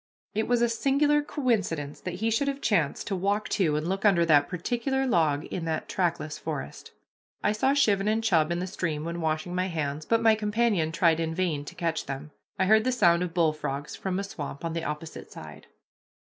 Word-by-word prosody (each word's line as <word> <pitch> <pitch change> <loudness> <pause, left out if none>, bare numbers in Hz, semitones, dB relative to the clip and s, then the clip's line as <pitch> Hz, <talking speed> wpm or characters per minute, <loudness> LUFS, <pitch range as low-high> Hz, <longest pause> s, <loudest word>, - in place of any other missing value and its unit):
It 220 +1 -1
was 240 -1 +2
a - - +4
singular 280 +5 +2
coincidence 200 - -1
that 180 -1 -4
he 225 - +2
should 255 +6 +1
have 275 0 -1
chanced 175 - 0
to 195 - -2
walk 200 +3 0
to 160 -6 +1
and 155 +2 -1
look 195 +1 -2
under 185 -5 +4
that 145 -3 +4
particular 245 - -1
log 160 - +2
in 170 - -5
that 160 -1 -2
trackless 165 -4 -2
forest. 70 +2 -6 0.5
I - - +3
saw 265 +6 +2
chivin 205 -8 +3
and 220 +1 +1
chub 170 -7 +3
in 170 - 0
the 180 - -2
stream 165 -5 -3
when 170 +1 -4
washing 160 +2 -1
my 185 +1 0
hands, 155 -3 -3
but 230 - +3
my 225 -1 +6
companion 210 -6 +1
tried 165 -1 +3
in 160 0 -2
vain 165 -6 -1
to - - -9
catch 165 -2 -2
them. 140 +2 -6 0.3
I 190 - +2
heard 220 +2 +5
the 255 - +1
sound 170 -8 +4
of 180 -1 -3
bullfrogs 150 -4 -1
from 185 -1 -3
a 200 - -1
swamp 145 -5 -6
on 165 - -2
the 165 0 -3
opposite 150 +2 -6
side. - - -11
180 Hz, 210 wpm, -27 LUFS, 160-220 Hz, 0.5 s, my